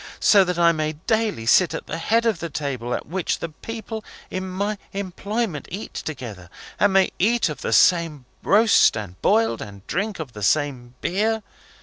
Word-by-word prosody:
So 200 -2 +6
that 180 -1 -2
I 170 -1 +5
may 155 -1 -1
daily 215 - -1
sit 165 +8 +4
at - - -6
the 165 - -5
head 230 +7 +2
of 220 -7 +1
the 170 - -4
table 130 -5 -3
at - - -5
which 180 +3 -2
the 165 - -5
people 220 +6 -7 0.3
in 185 0 -3
my 200 +3 -2
employment 200 -2 -3
eat 200 +5 -6
together, 110 - -7 0.3
and 205 - +4
may 195 -1 +4
eat 230 0 +2
of 150 - -6
the - - -2
same 165 -6 +3 0.2
roast 210 - +5
and 95 -4 -7
boiled, 115 0 +2
and 100 -1 -9
drink 205 +1 -2
of 145 -7 -7
the 105 - -9
same 125 +1 0
beer! 215 +4 0
170 Hz, 185 wpm, -23 LUFS, 140-205 Hz, 0.3 s, So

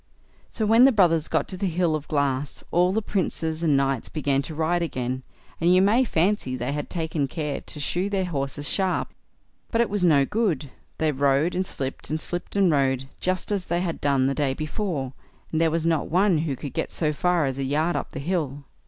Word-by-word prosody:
So 220 - -2
when 225 +4 +6
the 270 - +7
brothers 170 - +3
got - - 0
to 185 - -5
the 195 +1 -1
hill 170 -1 +1
of 155 -1 -3
glass, 140 -2 -1
all 180 +1 +3
the 220 +2 0
princes 165 -5 -2
and 155 -4 +3
knights 135 -3 0
began 140 -3 0
to 155 +2 -7
ride 165 +3 +1
again, 130 -5 -2 0.4
and 170 +2 +3
you - - +6
may 210 +7 +4
fancy 175 - +1
they 125 +2 -3
had 145 0 -4
taken 160 -4 -1
care 150 -1 -3
to 150 - -7
shoe 180 +6 -1
their 195 -2 0
horses 145 -3 -3
sharp; 190 -2 +1 0.6
but 230 - 0
it 235 -3 +2
was 205 -3 0
no 145 -6 +5
good—they 160 - -2
rode 140 +4 +2
and 185 +1 -1
slipped, 135 -6 -5
and 155 +1 -1
slipped 175 +4 -4
and 195 -4 +4
rode, 135 -2 +1
just 185 +2 -1
as 195 -3 -1
they 175 +1 0
had 170 -3 -3
done 140 -2 +2
the 135 - +1
day 135 -2 0
before, 155 - -3 0.4
and 160 - +1
there 165 - +4
was 165 0 -1
not 165 -3 +1
one 185 0 +3
who 150 -3 -1
could 135 +2 -7
get - - -2
so 155 -2 -1
far 175 +1 +1
as 135 0 -3
a - - 0
yard 155 +6 0
up - - -3
the - - -7
hill. 145 -3 -2
160 Hz, 215 wpm, -25 LUFS, 140-180 Hz, 0.6 s, the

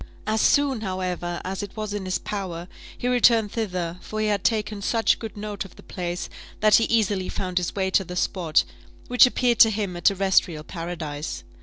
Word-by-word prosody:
As 215 0 +1
soon, 280 -5 +3
however, 180 -3 -3
as 190 +2 -4
it 205 +1 -8
was 215 -1 -3
in 205 -2 -4
his 185 0 0
power, 180 -4 -5 0.3
he 245 - -3
returned 235 -4 +4
thither; 180 -6 -3
for 215 - -6
he 215 - +1
had 205 -2 0
taken 215 -2 0
such 225 +2 +2
good 220 -2 -7
note 205 -1 -4
of 195 - -14
the - - -15
place, 175 -1 -4 0.3
that 215 0 +4
he 225 - +2
easily 205 -5 +1
found 185 -1 -1
his 175 - -3
way 190 -1 0
to 195 - +3
the 180 0 -8
spot, 170 - +1 0.5
which 250 +1 +7
appeared 245 -1 +1
to 225 - +9
him 205 -4 -2
a 175 - -6
terrestrial 190 -5 +2
paradise. 160 -3 -5
195 Hz, 195 wpm, -24 LUFS, 180-215 Hz, 0.5 s, to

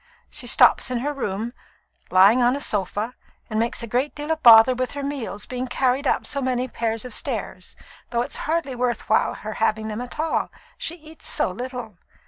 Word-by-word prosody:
She - - -3
stops - - +5
in 250 - -1
her 295 +3 -2
room, 225 -3 -3 0.6
lying 200 +7 +6
upon 245 +2 +3
a - - -3
sofa, 210 0 -1 0.4
and 215 - 0
makes 235 +2 -1
a 245 +5 0
deal 295 +2 -5
of 320 0 -1
bother 230 +1 +9
with 255 0 -2
her 285 0 -5
meals 265 -7 -4
being 255 0 -4
carried 260 +2 0
up - - +1
so 280 - -1
many 255 -1 0
pairs 225 -1 -2
of 250 - -6
stairs, 210 -8 -4 0.3
though 235 0 0
it's - - -6
hardly 320 -4 0
worth 245 -1 -2
while 220 - +3
her 215 0 -6
having 220 0 0
them 215 +2 -4
at 250 +4 -8
all, 320 +1 0 0.3
she - - -3
eats 315 -1 -11
so - - +1
little. 245 -2 -7
245 Hz, 195 wpm, -23 LUFS, 220-275 Hz, 0.6 s, bother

